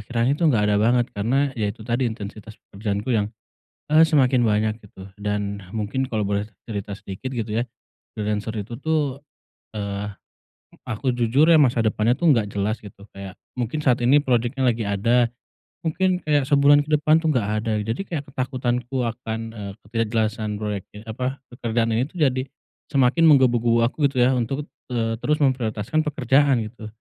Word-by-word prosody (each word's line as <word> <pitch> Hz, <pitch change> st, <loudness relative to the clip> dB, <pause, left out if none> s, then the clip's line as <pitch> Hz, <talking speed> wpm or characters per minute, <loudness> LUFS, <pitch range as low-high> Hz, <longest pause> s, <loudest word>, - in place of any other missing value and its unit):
Akhirnya 120 Hz, +4 st, 0 dB
itu 155 Hz, -, -1 dB
enggak 110 Hz, -7 st, +3 dB
ada 105 Hz, -, +3 dB
banget 120 Hz, +2 st, +3 dB
karena 130 Hz, +7 st, 0 dB
ya 110 Hz, -5 st, -1 dB
itu 110 Hz, +2 st, -7 dB
tadi 120 Hz, +2 st, 0 dB
intensitas 110 Hz, 0 st, -8 dB
pekerjaanku 105 Hz, +3 st, -4 dB
yang, 105 Hz, -3 st, +1 dB, 0.6 s
eee, 155 Hz, +2 st, +7 dB
semakin 135 Hz, -5 st, +3 dB
banyak 105 Hz, 0 st, +1 dB
gitu 95 Hz, -1 st, -12 dB
dan 100 Hz, -1 st, -3 dB
mungkin 110 Hz, +5 st, -1 dB
kalau 110 Hz, -4 st, -2 dB
boleh 100 Hz, +1 st, -1 dB, 0.2 s
cerita 100 Hz, -2 st, -4 dB
sedikit 100 Hz, +6 st, -7 dB
gitu 115 Hz, -3 st, -3 dB
ya. 120 Hz, -, +2 dB, 0.5 s
Freelancer 105 Hz, +1 st, -2 dB
itu 115 Hz, +4 st, -8 dB
tuh, 145 Hz, -2 st, -1 dB, 0.6 s
eee, 100 Hz, 0 st, -3 dB, 0.8 s
aku 125 Hz, +3 st, -1 dB
jujur 125 Hz, +6 st, +3 dB
ya 165 Hz, -, +7 dB
masa 125 Hz, -4 st, +3 dB
depannya 110 Hz, +1 st, +2 dB
tuh 170 Hz, -, +2 dB
enggak 110 Hz, -5 st, +1 dB
jelas 100 Hz, +2 st, -1 dB
gitu. 100 Hz, -1 st, -13 dB
Kayak 100 Hz, -1 st, -8 dB, 0.2 s
mungkin 125 Hz, +5 st, -2 dB
saat 125 Hz, -3 st, +3 dB
ini 140 Hz, +4 st, +5 dB
project-nya 125 Hz, +1 st, 0 dB
lagi 115 Hz, -1 st, 0 dB
ada, 115 Hz, +4 st, +2 dB, 0.5 s
mungkin 180 Hz, +3 st, 0 dB
kayak 145 Hz, -3 st, +1 dB
sebulan 145 Hz, 0 st, +6 dB
ke -, -, -9 dB
depan 155 Hz, +2 st, +4 dB
tuh 160 Hz, -, +2 dB
enggak 110 Hz, -5 st, 0 dB, 0.2 s
ada. 110 Hz, -, +1 dB
Jadi 115 Hz, -, -3 dB
kayak 155 Hz, -6 st, -4 dB
ketakutanku 125 Hz, -1 st, -2 dB
akan, 115 Hz, -1 st, -4 dB
eee, 100 Hz, -3 st, -6 dB
ketidakjelasan 110 Hz, -1 st, -1 dB
proyeknya 105 Hz, -1 st, -5 dB
apa, 125 Hz, +4 st, -3 dB
pekerjaan 115 Hz, -1 st, -1 dB
ini 125 Hz, -, +1 dB
itu -, -, -28 dB
jadi 130 Hz, -4 st, +2 dB, 0.5 s
semakin 140 Hz, +5 st, +3 dB
menggebu-gebu 120 Hz, -5 st, +4 dB
aku 145 Hz, +4 st, 0 dB
gitu 130 Hz, -2 st, 0 dB
ya 125 Hz, -, +5 dB
untuk, 135 Hz, +5 st, -2 dB, 0.2 s
eee, 115 Hz, -2 st, 0 dB
te -, -, -31 dB
terus 150 Hz, 0 st, +1 dB
memprioritaskan 125 Hz, +2 st, 0 dB
pekerjaan 135 Hz, -3 st, +2 dB
gitu. 110 Hz, 0 st, -9 dB
120 Hz, 170 wpm, -23 LUFS, 105-135 Hz, 0.8 s, eee